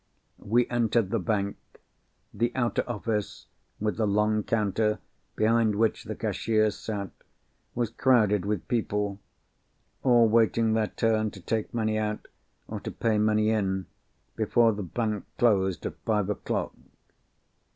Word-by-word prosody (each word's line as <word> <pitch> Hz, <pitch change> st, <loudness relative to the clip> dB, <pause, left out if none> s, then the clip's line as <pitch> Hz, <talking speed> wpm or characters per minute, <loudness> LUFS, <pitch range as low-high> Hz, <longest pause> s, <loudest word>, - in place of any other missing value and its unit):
We 120 Hz, +4 st, +2 dB
entered 115 Hz, -4 st, +1 dB
the 115 Hz, -, +1 dB
bank. 100 Hz, +1 st, -1 dB, 0.8 s
The 120 Hz, +1 st, 0 dB
outer 120 Hz, -2 st, +1 dB
office—with 105 Hz, -1 st, -4 dB
the 110 Hz, -2 st, +1 dB
long 105 Hz, +1 st, +2 dB
counter, 105 Hz, 0 st, 0 dB, 0.4 s
behind 110 Hz, -1 st, +2 dB
which 110 Hz, +1 st, +1 dB
the -, -, -5 dB
cashiers 110 Hz, -2 st, 0 dB
sat—was 105 Hz, +2 st, -7 dB
crowded 110 Hz, -6 st, +3 dB
with 105 Hz, -1 st, -2 dB
people; 105 Hz, -4 st, -1 dB, 0.8 s
all 120 Hz, -3 st, +5 dB
waiting 115 Hz, 0 st, +3 dB
their 110 Hz, -1 st, +1 dB
turn 110 Hz, -1 st, +1 dB
to 100 Hz, -, -12 dB
take 110 Hz, +4 st, -2 dB
money 110 Hz, -2 st, 0 dB
out, 105 Hz, 0 st, -3 dB, 0.4 s
or -, -, -5 dB
to -, -, -6 dB
pay 110 Hz, -2 st, 0 dB
money 110 Hz, 0 st, +3 dB
in, 95 Hz, -3 st, 0 dB, 0.5 s
before 115 Hz, +1 st, +3 dB
the 105 Hz, -, -5 dB
bank 105 Hz, +2 st, -2 dB
closed 95 Hz, -7 st, +2 dB
at -, -, -3 dB
five 105 Hz, -2 st, +1 dB
o'clock. -, -, -3 dB
110 Hz, 130 wpm, -27 LUFS, 105-115 Hz, 0.8 s, all